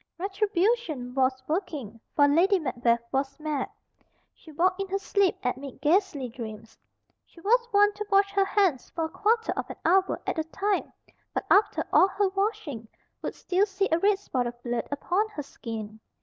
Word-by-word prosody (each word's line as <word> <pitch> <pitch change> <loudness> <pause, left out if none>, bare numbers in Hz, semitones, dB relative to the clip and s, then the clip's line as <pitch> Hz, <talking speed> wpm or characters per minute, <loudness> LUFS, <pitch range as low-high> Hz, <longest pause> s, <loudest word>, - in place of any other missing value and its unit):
Retribution 385 - 0
was 260 0 +1
working, 300 - -3 0.2
for 285 -1 +6
Lady 355 +7 +4
Macbeth 240 -6 0
was 270 +2 -1
mad. 300 -3 -2 0.6
She 320 - -15
walked 365 +5 +1
in 390 - -3
her 390 +1 -1
sleep 395 -1 +1
amid 260 +1 -4
ghastly 310 -2 +1
dreams. 225 -2 -9 0.5
She - - -19
was 475 +5 +3
wont 410 0 +5
to 425 - -3
wash 395 0 +4
her 395 -1 +3
hands 380 -10 +1
for 330 - -1
a - - -5
quarter 450 +6 +1
of - - -4
an - - -6
hour 375 +3 +3
at - - -1
a - - +1
time; 395 +4 -1 0.4
but - - -1
after 405 +1 +4
all 375 - +7
her 400 0 0
washing, 390 - -2 0.3
would - - -4
still 380 +3 +1
see 395 0 -1
a 325 - +3
red 405 +2 +3
spot 255 -11 -2
of 240 0 -7
blood 240 -1 -2
upon 360 +9 0
her 310 -9 -6
skin. 220 -5 -7
340 Hz, 180 wpm, -27 LUFS, 265-395 Hz, 0.6 s, all